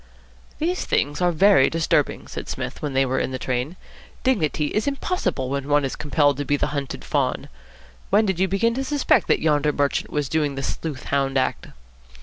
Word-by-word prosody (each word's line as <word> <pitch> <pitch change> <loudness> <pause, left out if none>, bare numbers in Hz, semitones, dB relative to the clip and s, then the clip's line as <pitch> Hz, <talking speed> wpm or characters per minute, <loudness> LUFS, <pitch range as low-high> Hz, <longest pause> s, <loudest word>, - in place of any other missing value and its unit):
"These 350 +4 -1
things 145 +4 0
are 175 0 +3
very 190 -3 +5
disturbing," 165 -1 0
said - - -7
Psmith, - - -5
when 145 -2 -3
they 135 0 +3
were 130 0 0
in - - -1
the 130 - -4
train. 130 +6 -2 0.5
"Dignity 160 - +1
is 215 +6 -1
impossible 275 - -1
when 140 0 -2
one 145 -1 +3
is 135 - -3
compelled 145 -2 +1
to 145 - -2
be 145 +1 +1
the 150 - -1
Hunted 140 - -4
Fawn. 65 - -1 0.6
When 210 +3 +4
did 190 -4 -1
you 190 - +3
begin 215 +5 +1
to 265 +3 -2
suspect 280 +1 +2
that - - +2
yonder 150 -1 +2
merchant 145 -1 0
was 150 -2 -1
doing 150 -1 0
the 135 - -4
sleuth 150 -3 -4
hound 135 -1 +1
act?" 130 - -1
150 Hz, 195 wpm, -23 LUFS, 135-190 Hz, 0.6 s, very